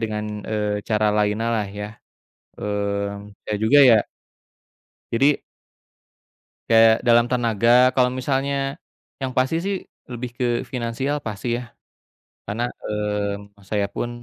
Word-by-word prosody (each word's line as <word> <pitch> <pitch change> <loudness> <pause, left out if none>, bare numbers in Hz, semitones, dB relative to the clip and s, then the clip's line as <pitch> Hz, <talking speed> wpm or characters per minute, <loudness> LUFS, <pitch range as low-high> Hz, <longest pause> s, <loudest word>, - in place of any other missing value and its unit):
dengan, 105 -1 -2 0.2
eee, 105 -1 -1
cara 105 -1 +2
lainnya 105 +2 +1
lah 110 -3 0
ya, 105 +2 -8 0.6
mmm, 100 0 -3
saya 105 -1 -2
juga 120 +7 +5
ya 115 -3 +8 1.2
jadi 140 +5 +3 1.3
kayak 115 0 +6
dalam 120 0 +6
tenaga 115 -2 +1 0.3
kalau 125 -1 +4
misalnya 135 +1 -1 0.5
yang 130 -1 -2
pasti 130 +5 +2
sih, 195 0 0 0.3
lebih 125 0 -5
ke 125 - -1 0.3
finansial 125 +4 -2
pasti 110 +2 -3
ya, 125 - -5 0.8
karena, 110 +4 -3
mmm, 105 -1 -4
saya 105 -2 +1
pun, 120 0 -4
115 Hz, 120 wpm, -22 LUFS, 105-125 Hz, 1.3 s, ya